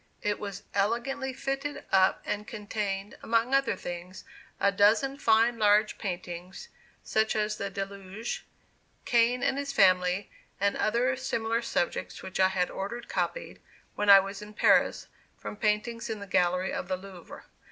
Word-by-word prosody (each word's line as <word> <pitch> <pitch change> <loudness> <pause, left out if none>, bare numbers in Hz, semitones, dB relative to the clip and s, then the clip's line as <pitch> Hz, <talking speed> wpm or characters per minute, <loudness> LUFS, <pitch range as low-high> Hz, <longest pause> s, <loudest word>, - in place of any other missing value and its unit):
It 205 0 0
was 200 -1 -6
elegantly 240 +7 0
fitted 275 +2 -4
up, 190 0 +3
and 210 +1 -3
contained, 205 -2 -4
among 230 +3 +1
other 275 -6 +3
things, 175 0 -7 0.4
a 200 - +3
dozen 220 +8 +3
fine 230 -1 +3
large 210 0 +3
paintings, 180 - -6 0.3
such 220 0 +1
as 215 0 0
"The 200 - -3
Deluge," 195 +2 -5 0.6
"Cain 240 +1 +3
and 275 +1 +1
his 280 0 -3
Family," 185 -2 +3 0.3
and 200 +1 +1
other 240 +4 +1
similar 230 -3 -1
subjects 230 -6 -2
which 190 - -6
I 190 - +6
had 185 -1 -1
ordered 235 +5 -5
copied, - - -3 0.3
when 205 0 -1
I 200 -1 +11
was 195 +1 -5
in 210 0 -11
Paris, - - +3 0.3
from - - -7
paintings 215 +3 -1
in 220 -1 -3
the 200 - -7
gallery 180 0 +1
of - - -4
the 185 -1 -1
Louvre. 185 -2 -11
210 Hz, 150 wpm, -28 LUFS, 195-230 Hz, 0.6 s, I